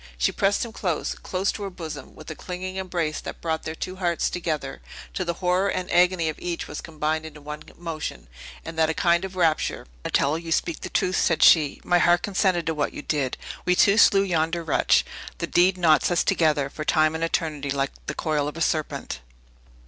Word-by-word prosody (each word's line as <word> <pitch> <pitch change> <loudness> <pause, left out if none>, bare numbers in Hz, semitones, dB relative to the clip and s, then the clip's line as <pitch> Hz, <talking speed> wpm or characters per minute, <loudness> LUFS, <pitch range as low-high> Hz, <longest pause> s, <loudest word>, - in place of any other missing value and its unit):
She - - +2
pressed 200 +3 +1
him 230 - -8
close, 180 -7 -2
close 190 +2 -2
to - - -8
her 200 - -3
bosom, 160 -6 -8
with 155 - -9
a - - -6
clinging 185 +2 -6
embrace 175 -5 -2
that - - -7
brought 160 -1 -2
their 160 - -4
two 185 +3 -5
hearts 175 -3 0
together, 155 -6 -3 0.3
till 185 - -3
the 170 - -1
horror 180 +2 +1
and 185 -1 -3
agony 180 -1 +4
of 155 - -3
each 175 -1 -4
was 150 - -6
combined 155 0 -2
into 155 -1 -10
one 150 +1 -7 0.2
emotion, 165 -3 -5 0.4
and 165 0 -6
that 160 0 +4
a 160 - -1
kind 170 -1 +3
of 190 -1 -6
rapture. 165 -4 +1
"Yes, - - -26 0.2
Donatello, 140 +2 +2
you 165 0 -7
speak 165 0 0
the - - -5
truth!" 185 +1 +1
said 165 -3 +2
she; 155 -4 +5
"my 175 0 +3
heart 175 0 +4
consented 185 -4 +1
to 165 - 0
what 150 -2 -1
you - - -7
did. 140 -4 -1 0.3
We 180 - +2
two 200 +4 +5
slew 195 -3 +6
yonder 170 -2 0
wretch. 160 - +3 0.3
The - - -2
deed 185 +2 +3
knots 165 -3 +4
us 175 -1 +2
together, 155 -7 +2
for 155 - -5
time 155 0 +3
and 160 +1 -3
eternity, 155 -4 -1
like 135 0 0 0.2
the 140 - -3
coil 150 -2 0
of 150 - -6
a - - -5
serpent!" 155 -2 -1
165 Hz, 215 wpm, -25 LUFS, 155-180 Hz, 0.4 s, slew